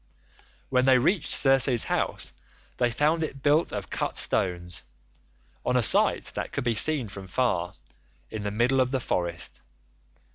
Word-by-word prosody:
"When 125 Hz, -1 st, +2 dB
they 130 Hz, -1 st, +5 dB
reached 160 Hz, +6 st, 0 dB
Circe's 135 Hz, -3 st, +4 dB
house -, -, -3 dB, 0.4 s
they 120 Hz, -, +1 dB
found 150 Hz, +7 st, 0 dB
it 135 Hz, -4 st, -7 dB
built 150 Hz, +3 st, +2 dB
of -, -, -6 dB
cut -, -, -3 dB
stones, 90 Hz, -1 st, 0 dB, 0.8 s
on 125 Hz, -, 0 dB
a 125 Hz, -, +2 dB
site -, -, +4 dB
that -, -, -5 dB
could -, -, -3 dB
be 120 Hz, -1 st, 0 dB
seen 135 Hz, +2 st, +2 dB
from 100 Hz, -1 st, -10 dB
far, 90 Hz, -5 st, -1 dB, 0.6 s
in 110 Hz, -, -5 dB
the 105 Hz, -, -3 dB
middle 120 Hz, +5 st, +1 dB
of 130 Hz, -, 0 dB
the 130 Hz, 0 st, -1 dB
forest. 85 Hz, -7 st, -3 dB
125 Hz, 155 wpm, -26 LUFS, 100-135 Hz, 0.8 s, they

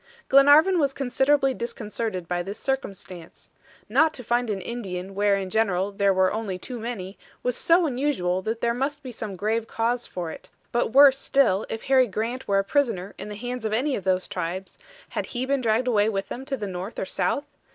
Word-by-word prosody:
Glenarvan 290 Hz, +7 st, +6 dB
was 280 Hz, -3 st, +1 dB
considerably 270 Hz, +1 st, +2 dB
disconcerted 220 Hz, -5 st, -4 dB
by 175 Hz, 0 st, -1 dB
this 195 Hz, +3 st, -6 dB
circumstance. 195 Hz, -10 st, -5 dB, 0.4 s
Not 315 Hz, -1 st, +3 dB
to 250 Hz, -, -5 dB
find 240 Hz, +1 st, 0 dB
an 200 Hz, -2 st, -1 dB
Indian 190 Hz, -3 st, -5 dB
where 200 Hz, 0 st, +2 dB
in 190 Hz, -1 st, -4 dB
general 200 Hz, -3 st, +1 dB
there 200 Hz, 0 st, +2 dB
were 190 Hz, 0 st, +2 dB
only 210 Hz, -4 st, -3 dB
too 245 Hz, +5 st, -7 dB
many, 210 Hz, -5 st, -6 dB, 0.2 s
was 250 Hz, -1 st, 0 dB
so 340 Hz, +1 st, +4 dB
unusual 245 Hz, -, 0 dB
that 225 Hz, +4 st, -3 dB
there 235 Hz, 0 st, +2 dB
must 280 Hz, +4 st, -2 dB
be 255 Hz, -, -6 dB
some 215 Hz, -4 st, -6 dB
grave 220 Hz, +4 st, -1 dB
cause 235 Hz, +2 st, -1 dB
for 175 Hz, -3 st, -5 dB
it; -, -, -11 dB, 0.2 s
but 240 Hz, -1 st, 0 dB
worse 275 Hz, +1 st, +7 dB
still 240 Hz, -9 st, +2 dB
if 225 Hz, -, -5 dB
Harry 260 Hz, -1 st, +4 dB
Grant 230 Hz, +5 st, -3 dB
were 200 Hz, -, +2 dB
a 195 Hz, -, +3 dB
prisoner 205 Hz, -6 st, 0 dB
in -, -, -6 dB
the 210 Hz, -, -6 dB
hands 245 Hz, +2 st, -5 dB
of 215 Hz, -1 st, -1 dB
any 265 Hz, +5 st, +1 dB
of 195 Hz, -, -5 dB
those 185 Hz, 0 st, +1 dB
tribes, 185 Hz, +3 st, -5 dB, 0.3 s
had -, -, -3 dB
he 255 Hz, -, 0 dB
been 275 Hz, 0 st, 0 dB
dragged 230 Hz, +2 st, +1 dB
away 215 Hz, -3 st, +3 dB
with 195 Hz, -2 st, -3 dB
them 260 Hz, +2 st, -6 dB
to 270 Hz, 0 st, -3 dB
the 210 Hz, -, -4 dB
north 190 Hz, +2 st, -6 dB
or -, -, -2 dB
south? 280 Hz, +8 st, -1 dB
225 Hz, 205 wpm, -25 LUFS, 195-260 Hz, 0.4 s, worse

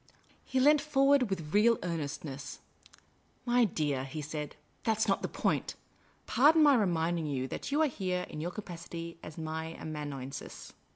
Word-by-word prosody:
He 260 Hz, -, -1 dB
leant 295 Hz, +2 st, +6 dB
forward, 275 Hz, -4 st, +3 dB
with 165 Hz, -5 st, -4 dB
real 225 Hz, +3 st, +5 dB
earnestness. 145 Hz, -4 st, -4 dB, 0.4 s
" -, -, -36 dB, 0.3 s
My 245 Hz, -1 st, +4 dB
dear," 145 Hz, -8 st, -1 dB
he 135 Hz, +4 st, -6 dB
said, 150 Hz, 0 st, -5 dB
" -, -, -38 dB
that 220 Hz, -1 st, +1 dB
's 220 Hz, -, +2 dB
not 195 Hz, -, +2 dB
the -, -, -1 dB
point. -, -, -1 dB, 0.5 s
Pardon 305 Hz, +6 st, +5 dB
my 290 Hz, -1 st, +7 dB
reminding 170 Hz, -, +1 dB
you 130 Hz, -3 st, -2 dB
that -, -, -5 dB
you 300 Hz, +3 st, +3 dB
are -, -, +4 dB
here 185 Hz, -7 st, -2 dB
in 150 Hz, -, -6 dB
your 170 Hz, -, -2 dB
capacity 170 Hz, -3 st, -7 dB
as 155 Hz, -, -10 dB
my 160 Hz, 0 st, -4 dB
amanuensis. 145 Hz, -3 st, -6 dB
170 Hz, 170 wpm, -31 LUFS, 150-235 Hz, 0.5 s, my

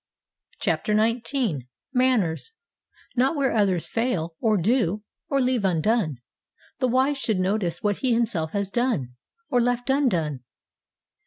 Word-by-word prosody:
CHAPTER 210 Hz, -, 0 dB
XIX 230 Hz, -, 0 dB, 0.3 s
MANNERS 250 Hz, -, +1 dB, 0.6 s
'Not 265 Hz, +5 st, +2 dB
where 275 Hz, -2 st, +1 dB
others 195 Hz, -6 st, +2 dB
fail, 185 Hz, -9 st, -1 dB
or 215 Hz, -2 st, +2 dB
do, 210 Hz, 0 st, +1 dB, 0.3 s
or 275 Hz, -, +2 dB
leave 250 Hz, -4 st, +1 dB
undone 185 Hz, -, +1 dB, 0.6 s
the 255 Hz, -, +2 dB
wise 265 Hz, +3 st, +2 dB
should 220 Hz, -6 st, 0 dB
notice 185 Hz, -2 st, -1 dB
what 205 Hz, -2 st, +1 dB
himself 230 Hz, -10 st, 0 dB
has 200 Hz, -1 st, -1 dB
done, 230 Hz, -, 0 dB, 0.4 s
or 245 Hz, -, +4 dB
left 245 Hz, +2 st, 0 dB
undone.' 175 Hz, -, +1 dB
225 Hz, 125 wpm, -25 LUFS, 180-255 Hz, 0.6 s, or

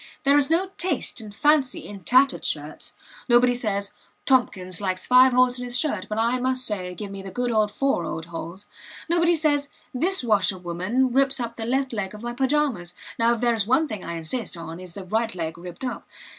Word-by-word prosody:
There 280 Hz, +1 st, +5 dB
is 290 Hz, -1 st, +3 dB
no 365 Hz, +4 st, +1 dB
taste 330 Hz, -8 st, -1 dB
and 215 Hz, -1 st, -9 dB
fancy 290 Hz, +3 st, +2 dB
in 205 Hz, -1 st, -8 dB
tattered 255 Hz, +9 st, +4 dB
shirts. -, -, -3 dB, 0.4 s
Nobody 245 Hz, +1 st, +5 dB
says, 200 Hz, -5 st, -2 dB, 0.3 s
"Tompkins 190 Hz, -9 st, +1 dB
likes 185 Hz, -2 st, -2 dB
five 255 Hz, +1 st, +6 dB
holes 250 Hz, 0 st, +3 dB
in -, -, -4 dB
his 245 Hz, 0 st, -1 dB
shirt, 305 Hz, +3 st, -1 dB
but 215 Hz, -, -3 dB
I 235 Hz, +3 st, +1 dB
must 255 Hz, 0 st, +1 dB
say, 185 Hz, -5 st, -3 dB
give 205 Hz, 0 st, -6 dB
me 195 Hz, 0 st, -7 dB
the 195 Hz, -, -8 dB
good 245 Hz, +5 st, -2 dB
old 215 Hz, -2 st, +2 dB
four 275 Hz, -9 st, 0 dB, 0.2 s
holes." 170 Hz, +3 st, -7 dB, 0.4 s
Nobody 340 Hz, 0 st, +3 dB
says, 290 Hz, -3 st, +1 dB, 0.2 s
"This 345 Hz, +6 st, 0 dB
washerwoman 195 Hz, +3 st, +1 dB
rips 270 Hz, +1 st, +2 dB
up 235 Hz, -1 st, -4 dB
the 225 Hz, -, -5 dB
left 265 Hz, +2 st, 0 dB
leg 210 Hz, -2 st, -3 dB
of 210 Hz, -, -11 dB
my 240 Hz, 0 st, -3 dB
pyjamas; 260 Hz, -8 st, 0 dB, 0.2 s
now 230 Hz, +1 st, +4 dB
if 230 Hz, -, -7 dB
there 240 Hz, -1 st, +3 dB
is 215 Hz, -3 st, -1 dB
one 300 Hz, +6 st, +3 dB
thing 210 Hz, -8 st, -6 dB
I 170 Hz, -, -5 dB
insist 180 Hz, +4 st, -3 dB
on 165 Hz, 0 st, -7 dB
it -, -, -9 dB
is 175 Hz, -, -9 dB
the 200 Hz, -, -6 dB
right 220 Hz, +2 st, -1 dB
leg 165 Hz, -2 st, -3 dB
ripped 175 Hz, +7 st, -8 dB
up." 250 Hz, -, -5 dB
235 Hz, 210 wpm, -24 LUFS, 195-265 Hz, 0.4 s, five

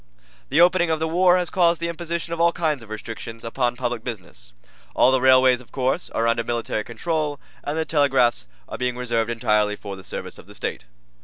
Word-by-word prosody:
The -, -, +2 dB
opening 175 Hz, -1 st, +4 dB
of 160 Hz, -, +1 dB
the 160 Hz, -, 0 dB
war 180 Hz, +2 st, +4 dB
has 180 Hz, -2 st, -2 dB
caused 170 Hz, -2 st, +3 dB
the 170 Hz, -, -2 dB
imposition 170 Hz, 0 st, -4 dB
of 170 Hz, -, -2 dB
all 170 Hz, 0 st, +5 dB
kinds 155 Hz, -6 st, -1 dB
of 110 Hz, -, -13 dB
restrictions 115 Hz, +1 st, -7 dB
upon 120 Hz, +1 st, -1 dB
public 120 Hz, -2 st, -3 dB
business. 90 Hz, -, -8 dB, 0.4 s
All 130 Hz, -, +5 dB
the 130 Hz, -1 st, +2 dB
railways, 130 Hz, -1 st, +5 dB
of 125 Hz, -, -19 dB
course, 135 Hz, +6 st, -1 dB
are 115 Hz, -, 0 dB
under 115 Hz, 0 st, +1 dB
military 115 Hz, -2 st, -2 dB
control, 150 Hz, +4 st, -2 dB, 0.2 s
and 145 Hz, +2 st, -3 dB
the 160 Hz, -, 0 dB
telegraphs 130 Hz, -, +2 dB, 0.2 s
are -, -, -7 dB
being 125 Hz, -1 st, -1 dB
reserved 115 Hz, -2 st, -1 dB
entirely 105 Hz, -2 st, +1 dB
for 100 Hz, -1 st, -8 dB
the 95 Hz, -, -12 dB
service -, -, -7 dB
of -, -, -15 dB
the -, -, -13 dB
State. -, -, -4 dB
130 Hz, 210 wpm, -23 LUFS, 115-160 Hz, 0.4 s, all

